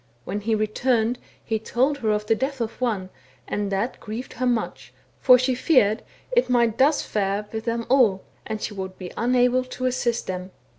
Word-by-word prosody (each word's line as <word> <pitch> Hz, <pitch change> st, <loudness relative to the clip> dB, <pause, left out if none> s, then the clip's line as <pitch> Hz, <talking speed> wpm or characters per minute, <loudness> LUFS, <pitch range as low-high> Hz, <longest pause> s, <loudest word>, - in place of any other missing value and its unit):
When 205 Hz, +3 st, -3 dB
he 220 Hz, +1 st, +1 dB
returned 225 Hz, +2 st, +1 dB, 0.3 s
he 220 Hz, -1 st, -1 dB
told 260 Hz, +6 st, 0 dB
her 220 Hz, -, -1 dB
of 210 Hz, 0 st, 0 dB
the 225 Hz, -, +3 dB
death 265 Hz, +4 st, -2 dB
of 230 Hz, +1 st, -4 dB
one, 200 Hz, -7 st, -1 dB, 0.4 s
and 205 Hz, -1 st, -2 dB
that 200 Hz, +6 st, -1 dB
grieved 225 Hz, +4 st, -6 dB
her 255 Hz, -, -1 dB
much, 240 Hz, -2 st, -2 dB, 0.3 s
for 255 Hz, -1 st, +7 dB
she 255 Hz, +1 st, +1 dB
feared 245 Hz, -5 st, +3 dB, 0.3 s
it -, -, +2 dB
might 235 Hz, -3 st, +2 dB
fare 210 Hz, -8 st, +1 dB
thus 210 Hz, -, -22 dB
with 220 Hz, 0 st, -4 dB
them 230 Hz, 0 st, -1 dB
all, 235 Hz, -8 st, +4 dB, 0.2 s
and 220 Hz, -1 st, -4 dB
she 210 Hz, -, -4 dB
would 190 Hz, -1 st, -6 dB
be 180 Hz, -2 st, -8 dB
unable 250 Hz, +1 st, +3 dB
to 255 Hz, 0 st, -5 dB
assist 245 Hz, -2 st, 0 dB
them. 185 Hz, 0 st, -5 dB
230 Hz, 190 wpm, -24 LUFS, 210-255 Hz, 0.4 s, for